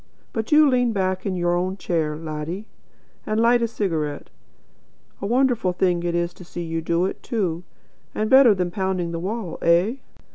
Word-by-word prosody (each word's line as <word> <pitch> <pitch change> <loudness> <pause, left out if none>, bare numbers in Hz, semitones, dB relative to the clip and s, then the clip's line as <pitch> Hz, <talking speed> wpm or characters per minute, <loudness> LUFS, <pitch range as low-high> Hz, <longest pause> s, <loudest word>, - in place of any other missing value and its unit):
But 220 -1 -3
you 305 0 +7
lean 245 -3 +2
back 185 -1 -1
in 190 - -1
your 175 -1 +1
own 185 +2 -1
chair, 160 -5 -1
laddie, 160 +5 -5 0.6
and 215 +1 -1
light 235 +1 +4
a 230 - +2
cigarette. 160 -10 -3 0.9
And 200 - -4
a - - -2
wonderful 245 -7 +2
thing 175 -1 +1
it 170 0 -1
is 170 0 -1
to 180 - -13
see 175 0 -6
you 165 0 -3
do 170 +2 +1
it, 190 - -4
too, 180 -7 -2 0.5
and 215 - 0
better 260 -3 +7
than 180 -2 -1
pounding 185 -2 -2
the 165 - -3
wall. 195 0 -4
Eh? 175 +9 +3
185 Hz, 185 wpm, -23 LUFS, 170-220 Hz, 0.9 s, you